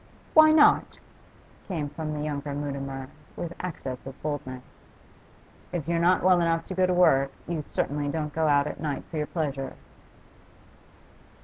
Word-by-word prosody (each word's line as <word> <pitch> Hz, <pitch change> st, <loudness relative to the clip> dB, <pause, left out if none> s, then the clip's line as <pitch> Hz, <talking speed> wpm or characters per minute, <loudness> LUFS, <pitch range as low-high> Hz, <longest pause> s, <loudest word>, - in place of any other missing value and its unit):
'Why 310 Hz, 0 st, +8 dB
not?' 310 Hz, -1 st, +5 dB, 0.7 s
came 160 Hz, -6 st, -2 dB
from 155 Hz, 0 st, -4 dB
the 150 Hz, -, -3 dB
younger 145 Hz, -1 st, -3 dB
Mutimer, 135 Hz, -2 st, -4 dB, 0.3 s
with 170 Hz, 0 st, -5 dB
access 135 Hz, -8 st, -5 dB
of 135 Hz, -, -9 dB
boldness. 130 Hz, -4 st, -4 dB, 1.1 s
'If 170 Hz, -4 st, -3 dB
you're 170 Hz, 0 st, +1 dB
not 180 Hz, +1 st, +3 dB
well 180 Hz, -1 st, +5 dB
enough 165 Hz, -1 st, +1 dB
to -, -, -5 dB
go 185 Hz, 0 st, +2 dB
to 180 Hz, -, +1 dB
work 135 Hz, -6 st, +4 dB, 0.2 s
you 170 Hz, -3 st, -2 dB
certainly 145 Hz, 0 st, -2 dB
don't 150 Hz, -1 st, -3 dB
go 160 Hz, -1 st, +1 dB
out 145 Hz, -1 st, +4 dB
at 150 Hz, -, -5 dB
night 145 Hz, -2 st, -3 dB
for 160 Hz, -, -4 dB
your 150 Hz, -1 st, -1 dB
pleasure. 140 Hz, -5 st, -3 dB
150 Hz, 155 wpm, -27 LUFS, 140-170 Hz, 1.1 s, Why